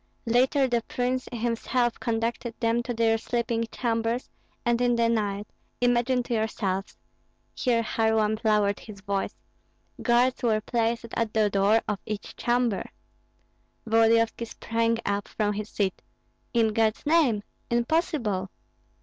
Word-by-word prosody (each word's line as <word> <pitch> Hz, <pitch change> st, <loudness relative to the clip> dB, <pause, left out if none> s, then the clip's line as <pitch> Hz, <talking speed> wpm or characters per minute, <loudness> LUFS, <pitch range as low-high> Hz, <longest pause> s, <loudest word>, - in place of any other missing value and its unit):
Later 260 Hz, +4 st, +3 dB
the 240 Hz, -2 st, +1 dB
prince 250 Hz, +1 st, -1 dB
himself 240 Hz, +1 st, 0 dB
conducted 230 Hz, 0 st, -2 dB
them 230 Hz, 0 st, +2 dB
to 245 Hz, -, -4 dB
their 225 Hz, 0 st, +2 dB
sleeping 230 Hz, 0 st, -1 dB
chambers, 230 Hz, 0 st, -1 dB, 0.3 s
and 240 Hz, 0 st, +2 dB
in 245 Hz, -1 st, +3 dB
the 235 Hz, 0 st, +3 dB
night 205 Hz, -3 st, 0 dB, 0.3 s
imagine 245 Hz, +1 st, +2 dB
to 240 Hz, -, -4 dB
yourselves" 210 Hz, -3 st, -2 dB, 0.6 s
(here 235 Hz, -3 st, +1 dB
Kharlamp 220 Hz, -2 st, +1 dB
lowered 210 Hz, -2 st, +2 dB
his 205 Hz, -3 st, -11 dB
voice) 200 Hz, 0 st, -2 dB, 0.7 s
"guards 245 Hz, +1 st, +3 dB
were 225 Hz, -3 st, +2 dB
placed 230 Hz, +1 st, -1 dB
at 225 Hz, -2 st, -1 dB
the 215 Hz, -2 st, +3 dB
door 200 Hz, +3 st, +4 dB
of 205 Hz, -, -1 dB
each 215 Hz, -2 st, -5 dB
chamber." 240 Hz, -4 st, 0 dB, 1.0 s
Volodyovski 225 Hz, +1 st, +3 dB
sprang 230 Hz, +1 st, 0 dB
up 200 Hz, 0 st, -1 dB
from 210 Hz, -1 st, -1 dB
his 210 Hz, +1 st, -5 dB
seat. 195 Hz, -3 st, -1 dB, 0.5 s
"In 230 Hz, -2 st, +3 dB
God's 220 Hz, 0 st, +1 dB
name! 290 Hz, -10 st, +3 dB, 0.3 s
impossible!" 235 Hz, -, 0 dB
230 Hz, 130 wpm, -26 LUFS, 215-240 Hz, 1.0 s, door